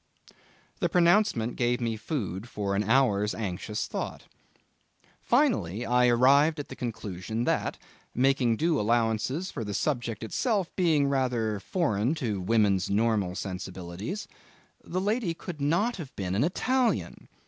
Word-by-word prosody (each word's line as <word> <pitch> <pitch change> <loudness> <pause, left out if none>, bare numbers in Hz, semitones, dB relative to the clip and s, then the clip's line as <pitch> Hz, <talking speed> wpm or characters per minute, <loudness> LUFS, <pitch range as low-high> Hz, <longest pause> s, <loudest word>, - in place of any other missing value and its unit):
The - - +1
pronouncement 175 - +3
gave 120 0 +1
me 115 -2 -1
food 110 - -4
for 100 -3 -2
an 100 - +1
hour's 105 -3 +2
anxious 105 0 -3
thought. - - -5 1.0
Finally 160 - +1
I 125 0 +3
arrived 140 +6 +4
at 145 - -6
the 130 - -7
conclusion 110 -2 -4
that, - - 0 0.4
making 125 -3 +2
due 160 +1 +1
allowances 115 - 0
for 115 - -4
the 105 -1 -4
subject 120 -6 -2
itself 200 - -1
being 160 -6 +3
rather 120 -6 0
foreign 125 - 0
to 110 - -2
women's 100 -2 +2
normal 105 -3 +1
sensibilities, 95 - -5 0.6
the 185 - -3
lady 205 -3 0
could 165 -3 -8
not 195 +12 +1
have 150 -7 -8
been 95 -2 -3
an 105 +6 +2
Italian. 245 - 0
120 Hz, 135 wpm, -28 LUFS, 105-160 Hz, 1.0 s, arrived